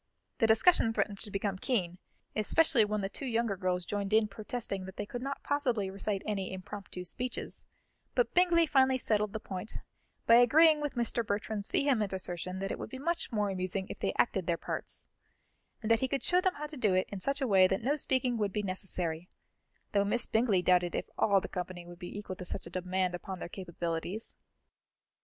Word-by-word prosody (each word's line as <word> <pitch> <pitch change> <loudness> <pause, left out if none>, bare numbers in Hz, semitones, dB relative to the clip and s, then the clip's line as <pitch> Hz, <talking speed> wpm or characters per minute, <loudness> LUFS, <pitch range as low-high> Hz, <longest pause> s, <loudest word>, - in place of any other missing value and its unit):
The 225 - +4
discussion 225 +1 +5
threatened 200 -1 -1
to 215 - 0
become 195 -1 -2
keen, 180 -8 -1 0.4
especially 245 +3 +4
when 210 0 -1
the 195 - -1
two 265 +7 -5
younger 230 -3 0
girls 180 -2 -1
joined 200 +2 -2
in 220 0 +5
protesting 210 -1 -4
that 190 0 -9
they 205 - -3
could 240 +4 -6
not 275 +2 -4
possibly 245 -9 0
recite 195 0 -2
any 200 -3 -2
impromptu 190 -1 -7
speeches; 250 +7 -4 0.5
but - - +2
Bingley 350 -2 +5
finally 265 -3 +4
settled 210 -4 +1
the 220 - -4
point 195 +1 -4 0.5
by 230 - +7
agreeing 305 +6 +6
with 295 -2 -3
Mr. 235 0 0
Bertram's 205 0 -3
vehement 230 -9 +2
assertion 185 0 -3
that 195 +1 -3
it - - -4
would - - -5
be 260 - -7
much 335 +4 -2
more 210 -3 0
amusing 185 +1 -2
if - - -8
they - - 0
acted 190 -7 +1
their 170 -1 +1
parts, - - -6 0.8
and 220 - 0
that 225 - +5
he 260 - +1
could 275 +1 -2
show 360 +1 +3
them 370 0 +1
how 300 - -5
to 300 0 -8
do 210 -7 +2
it 185 - +2
in 200 - -4
such 275 +8 -1
a 270 - 0
way 190 -3 +6
that 190 +3 -1
no 280 +5 +2
speaking 260 -4 0
would 205 -2 0
be 210 +1 -2
necessary, 180 -3 -3 0.6
though 200 -2 +3
Miss 220 +4 +2
Bingley 220 -5 +2
doubted 180 -1 +3
if - - -1
all 200 -2 +4
the - - -6
company 180 -1 -5
would 175 0 -11
be 180 +2 -7
equal 205 -2 -5
to - - -6
such 180 - -4
a 170 - -10
demand 185 0 -1
upon 185 +2 -5
their - - -6
capabilities. 175 +2 -4
205 Hz, 205 wpm, -31 LUFS, 185-245 Hz, 0.8 s, by